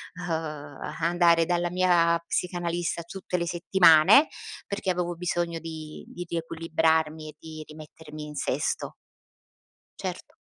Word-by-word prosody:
uhm, 180 -1 -6 0.7
andare 170 0 +4
dalla 175 0 0
mia 175 -2 +3
psicanalista 175 -1 -2
tutte 180 +1 -4
le 170 -1 -2
settimane 175 - +6 0.4
perché 200 -2 -1
avevo 175 -1 -2
bisogno 170 -1 -2
di 160 -1 -8
di 175 - -7
riequilibrarmi 160 -1 0
e 150 - -12
di 155 -1 -9
rimettermi 155 0 -10
in 150 0 -9
sesto. 140 - -2 1.0
Certo. - - -6
170 Hz, 115 wpm, -27 LUFS, 160-175 Hz, 1.0 s, settimane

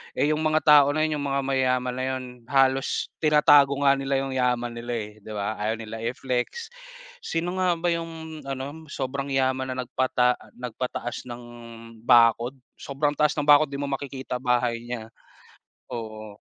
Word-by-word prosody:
Eh, 150 - +2
yung 155 - 0
mga 155 0 +1
tao 150 -2 +7
na 155 - +2
yun, 155 -1 0
yung 140 - -2
mga 140 0 0
mayaman 130 -2 +1
na 130 - -2
yun, 130 -1 -2 0.2
halos 135 0 +1
tinatago 145 -2 +5
nga 140 0 +4
nila 135 0 -1
yung 135 - -4
yaman 125 -2 0
nila, 120 +1 -5
eh, 105 -2 -4
'di 110 +1 -11
ba, 105 +1 -3
ayaw 110 +2 0
nila 110 0 -7
i-flex. 125 - -3 0.5
Sino 180 - -3
nga 180 -2 +2
ba 170 +1 0
yung 165 -1 -5
ano, 140 +4 -6
sobrang 140 0 -4
yaman 130 -1 0
na 130 - -2
nagpata 125 0 +1 0.2
nagpataas 125 0 -5
ng 120 0 -8 0.6
bakod, 120 +2 +5 0.2
sobrang 145 +1 -1
taas 150 +1 +1
ng 150 - -1
bakod, 145 +1 +6
'di 140 - -7
mo 140 0 -3
makikita 135 -2 -4
bahay 125 -1 +1
niya. 115 -2 -6 0.8
Oo. 110 -2 -7
135 Hz, 165 wpm, -25 LUFS, 125-145 Hz, 0.8 s, tao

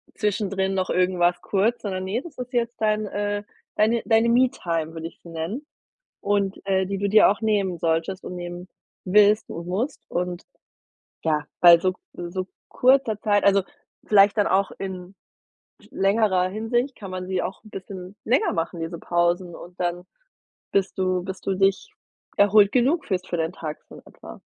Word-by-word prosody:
zwischendrin 195 -2 -1
noch 185 -1 -1
irgendwas 180 -1 +2
kurz, 215 +5 0
sondern, 190 -3 -3
ne, 210 +6 -2
das 335 -4 -12
ist 250 +1 -6
jetzt 240 -1 -1
dein, 215 0 +1
äh, 205 0 -2 0.3
deine 225 +2 +2
deine 225 +1 +3
Me-Time, 170 -10 +1
würde 165 0 -5
ich - - -15
sie 170 - -13
nennen. 165 - -4 0.6
Und, 200 -1 0
äh, 190 -1 +2
die 195 +1 -3
du 200 0 0
dir 215 +2 +7
auch 205 +3 -1
nehmen 200 -5 0
solltest 165 +4 -1
und 180 - -7
nehmen 175 0 -7 0.4
willst 210 +2 +4
und 170 +1 -7
musst 230 +11 -3
und, 180 0 -3 0.8
ja, 150 -2 +1 0.2
bei 175 -1 +9
so 185 +1 0 0.2
so 175 +2 -5 0.2
kurzer 255 -4 +3
Zeit 205 -2 +2
also, 200 -1 +4 0.4
vielleicht 200 0 +5
dann 205 - +3
auch 195 +1 +1
in 185 -1 -7 0.8
längerer 195 -2 +2
Hinsicht, 240 +6 -1
kann 200 -3 -9
man 185 0 -5
sie 185 -1 -1
auch 190 +2 -6
'n 215 - -15
bisschen 190 0 -8
länger 250 +5 +2
machen, 165 +1 -3
diese 165 +1 -4
Pausen, 175 +1 0
und 175 +1 -13
dann 175 0 -2 0.7
bist 195 -1 0
du 185 -1 0
bis 190 0 -7
du 195 - -1
dich 195 0 +1 0.5
erholt 205 0 +5
genug 270 +7 +2
fühlst 185 -2 -2
für - - -2
deinen 160 0 -1
Tag 155 -4 -6
so - - -12
in - - -12
etwa. - - -13
195 Hz, 175 wpm, -24 LUFS, 180-210 Hz, 0.8 s, bei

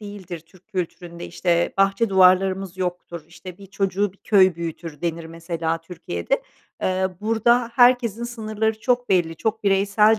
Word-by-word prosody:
değildir 195 -5 -8
Türk 170 +3 -23
kültüründe. 175 -1 -5
İşte, 170 -1 0
bahçe 195 +3 +2
duvarlarımız 190 0 +3
yoktur, 175 -3 -4
işte, 175 +1 -11
“Bir 200 - -12
çocuğu 195 0 -1
bir - - -25
köy 190 -4 +4
büyütür.” 165 -2 -6
denir, 170 -1 -3
mesela, 165 0 -3
Türkiye'de. 160 - -3 0.4
Eee, 185 0 +1
burada 230 +2 +2
herkesin 245 -3 +4
sınırları 220 -2 -2
çok 245 -1 0
belli, 170 -4 +1
çok 220 -1 -2
bireysel 200 +2 +4
190 Hz, 140 wpm, -22 LUFS, 170-215 Hz, 0.4 s, köy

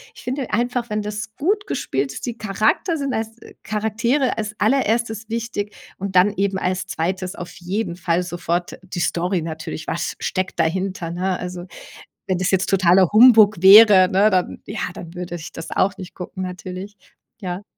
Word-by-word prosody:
ich - - -13
finde 260 0 -4
einfach, 240 +1 -1
wenn 210 0 0
das 210 +1 -6
gut 400 +7 0
gespielt 135 - -2
ist, - - -6
die 240 -2 -5
Charakter 215 - 0
sind 275 -2 -2
als 225 0 -3 0.3
Charaktere 230 +6 0
als 210 -1 -4
Allererstes 225 -1 +1
wichtig 225 -3 -4 0.2
und 195 0 -5
dann 200 +3 +5
eben 195 -1 0
als 185 0 -2
2. 185 +3 -3
auf 175 0 -8
jeden 180 0 -3
Fall 175 0 0
sofort 175 0 -3
die 185 -1 -6
Story 175 +1 0
natürlich. 160 -1 -6
Was 170 - -3
steckt 185 -1 -2
dahinter, 180 +1 -1
ne? 185 +1 -1
Also, 180 0 -6 0.6
wenn 185 -2 0
das 185 +1 0
jetzt 190 -1 +1
totaler 185 -1 +4
Humbug 215 -4 +7
wäre, 195 -1 +9
ne, 200 +3 +4
dann, 185 -1 0
ja 210 0 -6 0.2
dann 165 -1 -9
würde 175 0 -5
ich 165 - -8
das 165 - -8
auch 195 +1 +1
nicht 185 - -9
gucken 185 +1 -7
natürlich, 185 +2 -7 0.5
ja. 185 0 -5
195 Hz, 170 wpm, -21 LUFS, 180-220 Hz, 0.6 s, wäre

